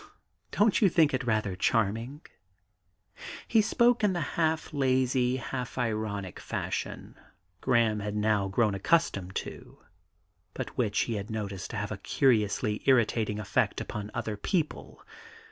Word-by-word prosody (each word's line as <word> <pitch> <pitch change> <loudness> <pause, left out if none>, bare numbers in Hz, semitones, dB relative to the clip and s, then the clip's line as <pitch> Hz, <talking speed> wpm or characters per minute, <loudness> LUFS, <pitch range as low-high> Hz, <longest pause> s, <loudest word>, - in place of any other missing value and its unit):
Don't 210 +1 +2
you 200 - +6
think 160 -5 +3
it 130 0 -1
rather 110 -5 0
charming?' 115 - 0 1.3
He 225 - +4
spoke 240 +1 +3
in 205 -2 +3
the 175 - -1
half 160 -1 0
lazy, 130 -2 +2
half 125 0 -5
ironic 110 -5 -2
fashion - - -4 0.5
Graham 115 -4 +2
had 105 0 -4
now 105 -2 +1
grown 105 +2 +1
accustomed 100 - +1
to, - - -6 0.8
but - - -5
which 110 -5 +1
he 115 -3 -1
had 100 +1 -6
noticed 100 -4 -4
to - - -5
have - - -3
a - - -3
curiously 110 -4 +1
irritating 115 -4 +3
effect 105 -3 0
upon 105 -1 -5
other 110 - -2
people. 155 - -3
115 Hz, 135 wpm, -29 LUFS, 105-135 Hz, 1.3 s, you